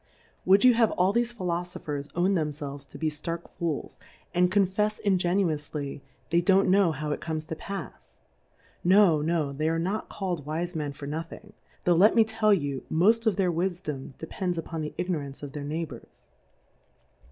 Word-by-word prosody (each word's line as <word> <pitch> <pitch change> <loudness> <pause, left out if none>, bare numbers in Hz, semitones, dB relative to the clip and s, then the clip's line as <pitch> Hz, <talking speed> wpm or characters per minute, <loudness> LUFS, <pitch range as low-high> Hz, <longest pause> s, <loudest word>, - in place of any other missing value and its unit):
Would 195 +2 +6
you 250 -1 +8
have 230 -2 +4
all 185 +2 +2
thefe 240 +1 +1
Phi 220 -6 -8
lofophers 170 -5 -3
own 180 +3 +2
tnemfelves 145 -4 -3
to - - -10
be 155 -1 -1
ftark 165 +3 -5
Fools, 165 -4 -3 0.3
and 180 0 +3
confefs 205 +2 +1
ingenuoufly 165 -7 0 0.3
they 170 +1 +4
don't 190 +1 +4
know 195 -3 +4
how 150 0 -3
it - - -3
comes 160 -1 -3
to 160 - -5
pafs: 195 +4 -8 0.7
No, 185 -4 +5
no, 155 -3 0
they 155 +3 0
are 165 - 0
not 190 +6 -2
called 180 -6 -3
Wijt^Men 155 -1 -3
for 140 - -8
nothing; 165 +8 -6 0.3
tho\ 175 - +4
let 190 +6 +5
me 230 - +7
tell 220 -1 +1
you, 145 -8 0
moft 220 +8 +3
of 215 - +3
their 185 -2 +2
Wifdom 170 -6 -3
depends 175 +2 -3
upon 165 0 -4
the 150 - -5
Igno 180 -3 -1
rance 140 0 -8
of 145 - -6
their 145 0 -6
Neighbours. 150 -4 -6
170 Hz, 175 wpm, -27 LUFS, 150-195 Hz, 0.7 s, you